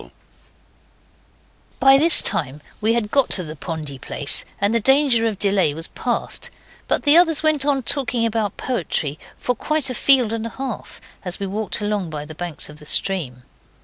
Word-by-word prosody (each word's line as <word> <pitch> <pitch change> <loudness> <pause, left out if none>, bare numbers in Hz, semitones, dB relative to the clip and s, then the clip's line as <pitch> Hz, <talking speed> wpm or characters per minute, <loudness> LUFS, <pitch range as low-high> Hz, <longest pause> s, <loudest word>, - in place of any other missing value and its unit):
By 270 0 +6
this 325 +2 +6
time 150 -5 0 0.2
we 220 +2 +2
had 220 -3 -2
got 275 -6 +3
by 185 - -3
the 155 -1 -8
pondy 150 -4 -6
place - - -2
and 200 +2 +1
the 230 - +2
danger 265 -1 +3
of 215 -3 -3
delay 195 -7 +1
was 165 +1 -7
past; 245 -2 -3 0.4
but - - +1
the 290 +1 +5
others 325 -3 +2
went 305 -3 +2
on 275 -3 +1
talking 250 -3 +2
about 220 -3 -2
poetry 160 - -3 0.2
for 250 - -1
quite 295 +2 -1
a - - -3
field 250 -3 +4
and 230 0 -3
a - - -6
half, 260 -2 -7 0.2
as 180 -1 +1
we 200 - -3
walked 210 +3 -3
along 205 -4 -2
by 150 -1 -6
the 155 - -10
banks 170 -1 -6
of 150 0 -12
the 150 - -13
stream. 145 -13 -1
215 Hz, 180 wpm, -20 LUFS, 170-265 Hz, 0.4 s, By